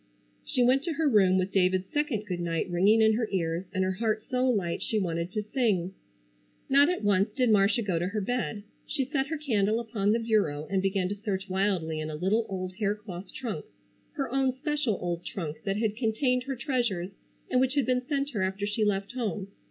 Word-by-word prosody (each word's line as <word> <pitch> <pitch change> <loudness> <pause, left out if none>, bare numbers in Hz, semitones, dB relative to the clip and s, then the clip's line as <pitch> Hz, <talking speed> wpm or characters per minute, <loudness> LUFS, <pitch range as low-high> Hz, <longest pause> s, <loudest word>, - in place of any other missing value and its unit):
She 250 - +1
went 255 +2 +4
to 340 - -1
her 320 0 +1
room 195 -7 +5
with 185 +1 0
David's 185 -1 +2
second 290 -8 0
good 180 -4 -3
night 165 -2 -1
ringing 200 +6 +4
in 220 0 +5
her 225 0 -1
ears 170 -1 -1
and 190 -1 0
her 185 - +1
heart 215 +2 -1
so 255 0 +2
light 190 -8 0
she 220 - -1
wanted 170 -3 -1
to 215 +1 -2
sing. 205 -6 0 0.7
Not 280 +3 +5
at 360 -9 -1
once 200 0 +3
did 245 +2 +1
Marcia 210 +3 +4
go 185 -5 0
to 175 - -1
her 210 +3 -2
bed. 220 -1 -2 0.2
She 275 -4 -1
set 270 0 -1
her 320 +2 -3
candle 220 -7 +1
upon 215 -3 0
the 225 - +3
bureau 210 -11 +1
and 190 -1 +2
began 195 -1 +1
to 205 0 -5
search 195 -2 -2
wildly 185 -5 0
in 155 0 -3
a 155 - -4
little 205 +8 +1
old 185 -1 -4
hair 205 -1 +1
cloth 195 -3 -9
trunk, 240 -5 -5 0.5
her 275 -5 -3
own 265 -1 +2
special 290 -6 -1
old 175 -1 -3
trunk 160 -5 -5
that 195 0 0
had 215 -1 0
contained 250 +2 +1
her 270 -1 -3
treasures 235 - -1 0.4
and 255 - +4
which 260 +1 +1
had 280 -4 +2
been 250 0 +1
sent 280 +2 -2
her 210 -6 -2
after 190 +2 -1
she 210 +2 -1
left 200 -1 0
home. 215 -5 -3
210 Hz, 215 wpm, -28 LUFS, 190-250 Hz, 0.7 s, room